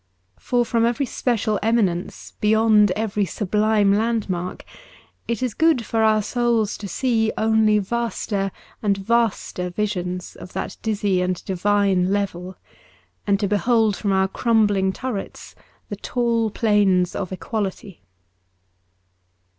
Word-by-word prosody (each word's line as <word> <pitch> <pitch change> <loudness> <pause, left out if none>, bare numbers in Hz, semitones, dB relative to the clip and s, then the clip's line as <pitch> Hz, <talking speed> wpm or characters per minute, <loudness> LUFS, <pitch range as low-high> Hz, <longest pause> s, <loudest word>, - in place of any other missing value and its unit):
For 245 -1 0
from 230 0 +1
every 240 +4 +1
special 225 -4 -1
eminence 205 -6 -1
beyond 215 -1 +4
every 210 -1 -1
sublime 210 +2 +1
landmark, 205 -5 -2 0.6
it 235 0 -2
is 250 -4 -1
good 320 -8 +2
for 225 +1 0
our 215 -1 +3
souls 235 -2 0
to 205 - -6
see 225 +1 0
only 220 -1 +3
vaster 205 -2 -2 0.3
and 200 -2 +1
vaster 195 -4 0
visions 180 -2 -3
of 185 - -11
that - - -4
dizzy 205 -4 0
and 180 -1 -2
divine 195 -1 +1
level, 190 -2 -3 0.7
and 200 -1 +2
to 200 - +1
behold 220 +1 +2
from 200 -1 -2
our 190 0 +2
crumbling 205 -3 +2
turrets 235 -1 -6 0.4
the 205 - -4
tall 230 0 0
plains 200 -5 +2
of 195 -2 -4
equality. 195 - -5
210 Hz, 125 wpm, -22 LUFS, 195-225 Hz, 0.7 s, beyond